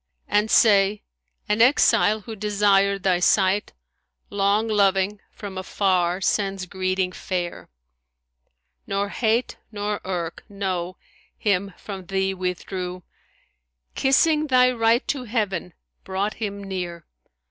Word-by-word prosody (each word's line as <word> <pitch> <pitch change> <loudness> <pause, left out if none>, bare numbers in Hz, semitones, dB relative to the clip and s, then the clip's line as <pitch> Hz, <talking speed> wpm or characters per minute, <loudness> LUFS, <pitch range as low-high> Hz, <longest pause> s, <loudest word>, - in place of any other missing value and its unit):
And 210 +1 +1
say 205 -2 +4 0.4
An 210 +2 +1
exile 230 -4 +4
who 220 +2 -8
desired 200 -1 +2
thy 185 -2 +2
sight 195 +2 +2 0.3
* 60 0 -50
Long 205 +2 +1
loving, 200 -1 +2
from 195 -3 -8
afar 185 -1 0
sends 195 -1 0
greeting 185 0 -1
fair. 175 -2 -4 1.2
Nor 200 +1 -1
hate 230 +3 0
nor 205 0 -3
irk 175 -3 -4
(No!) 185 -3 -3 0.4
him 200 -2 0
from 190 -3 -8
thee 190 0 0
withdrew, 180 0 -4 0.4
* 60 0 -51
Kissing 305 +3 +3
thy 255 -2 +5
right 230 +1 +2
to 270 -4 -2
Heaven 205 -6 -2 0.3
brought 195 +2 -2
him 200 -2 -5
near. 180 -3 -5
195 Hz, 115 wpm, -23 LUFS, 185-210 Hz, 1.2 s, thy